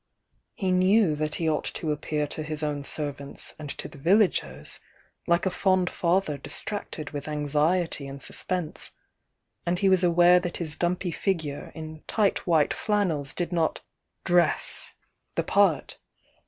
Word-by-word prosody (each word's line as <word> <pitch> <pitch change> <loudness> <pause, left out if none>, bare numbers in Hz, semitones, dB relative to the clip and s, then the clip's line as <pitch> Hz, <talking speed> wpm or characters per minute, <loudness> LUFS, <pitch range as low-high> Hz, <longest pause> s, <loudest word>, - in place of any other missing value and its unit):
"e 190 -2 0
"cnew 185 -1 +4
Kt 155 0 -2
he 165 - -1
ought 155 -1 +1
to 155 - -3
appear 150 0 -1
to 145 - -5
his 155 0 -3
own 145 -1 -1
^rvants 140 -1 -3
and 150 -2 -6
5o - - -6
the - - -12
vmairs 195 +6 +1 0.5
like 170 +1 +3
a 190 - +1
fond 185 -1 +2
father 170 -4 +1
distracted 155 -1 -5
with 145 -1 -5
Sriety 150 +2 0
aXsuspense, 155 +4 -3 0.7
and 175 +1 0
he 195 +1 +3
was 190 -1 +4
aware 175 +1 +6
^.^Ji^ 170 -3 -4
dumpy 175 +1 0
figure 160 -6 -2
in 155 -1 -8
tight 205 -4 +1
white 160 -4 +3
flannels 180 -10 0
did 175 -1 -2
not 165 -2 0 0.4
dress 175 -2 +2 0.4
the - - +1
part. - - +2
165 Hz, 140 wpm, -27 LUFS, 150-180 Hz, 0.7 s, aware